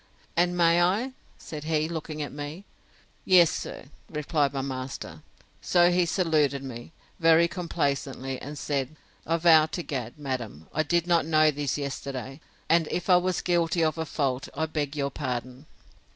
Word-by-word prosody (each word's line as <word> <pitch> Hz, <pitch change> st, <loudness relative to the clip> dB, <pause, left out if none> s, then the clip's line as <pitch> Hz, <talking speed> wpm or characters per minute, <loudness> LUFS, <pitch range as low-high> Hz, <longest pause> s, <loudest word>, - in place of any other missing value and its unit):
And 175 Hz, +1 st, +2 dB
may 170 Hz, 0 st, +4 dB
I? 205 Hz, +9 st, +1 dB, 0.3 s
said 150 Hz, -1 st, -8 dB
he, 155 Hz, -1 st, +1 dB
looking 155 Hz, -2 st, -4 dB
at 145 Hz, -, -6 dB
me. 145 Hz, +6 st, -7 dB, 0.6 s
Yes, 175 Hz, -3 st, +6 dB
sir, -, -, -6 dB, 0.2 s
replied 150 Hz, -2 st, 0 dB
my 135 Hz, -1 st, -3 dB
master. 130 Hz, -1 st, -6 dB, 0.4 s
So 175 Hz, 0 st, +4 dB
he 175 Hz, -1 st, +2 dB
saluted 155 Hz, -6 st, +1 dB
me, 120 Hz, 0 st, -8 dB, 0.3 s
very 165 Hz, 0 st, +5 dB
complaisantly; 140 Hz, -6 st, -2 dB
and 145 Hz, +2 st, -7 dB
said, 140 Hz, 0 st, -2 dB, 0.3 s
I 165 Hz, +1 st, +2 dB
vow 160 Hz, -2 st, +6 dB
to 175 Hz, +2 st, -4 dB
Gad, 125 Hz, -5 st, -5 dB
madam, 125 Hz, -, -5 dB
I -, -, +1 dB
did 170 Hz, +1 st, +1 dB
not 170 Hz, -3 st, +2 dB
know 155 Hz, -1 st, +4 dB
this 145 Hz, -1 st, -2 dB
yesterday; 135 Hz, 0 st, -5 dB, 0.3 s
and 165 Hz, -1 st, +3 dB
if 180 Hz, +1 st, -1 dB
I 180 Hz, -, +8 dB
was 180 Hz, 0 st, 0 dB
guilty 170 Hz, -1 st, +1 dB
of 160 Hz, +1 st, 0 dB
a 160 Hz, -, -1 dB
fault, 135 Hz, -3 st, -1 dB
I 160 Hz, +2 st, 0 dB
beg 150 Hz, -2 st, -3 dB
your 140 Hz, -1 st, -1 dB
pardon. 130 Hz, 0 st, -5 dB
155 Hz, 165 wpm, -27 LUFS, 140-170 Hz, 0.6 s, I